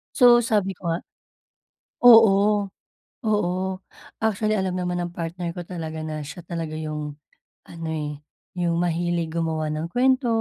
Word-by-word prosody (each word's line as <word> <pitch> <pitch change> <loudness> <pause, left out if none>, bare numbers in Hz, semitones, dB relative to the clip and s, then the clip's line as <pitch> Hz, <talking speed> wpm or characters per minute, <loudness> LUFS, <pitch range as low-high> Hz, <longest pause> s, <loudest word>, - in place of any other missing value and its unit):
So 245 -2 +7
sabi 210 -4 +1
ko 180 -1 -8
nga 165 +1 -1 1.0
oo, 210 -3 +7 0.5
oo. 210 -5 +1 0.7
Actually 215 0 0
alam 190 -1 -1
naman 180 -1 -2
ng 175 0 -4
partner 170 +1 -4
ko 175 - -5
talaga 160 -3 -6
na 155 -1 -4
siya 160 +4 -9
talaga 165 -2 -5
yung 150 -1 -4 0.5
ano, 165 -1 -8
eh, 150 -2 -4 0.4
yung 170 -1 +1
mahilig 170 -1 -1
gumawa 160 -2 -1
ng 155 +2 -2
kwento, 255 +7 +2
175 Hz, 140 wpm, -24 LUFS, 160-205 Hz, 1.0 s, So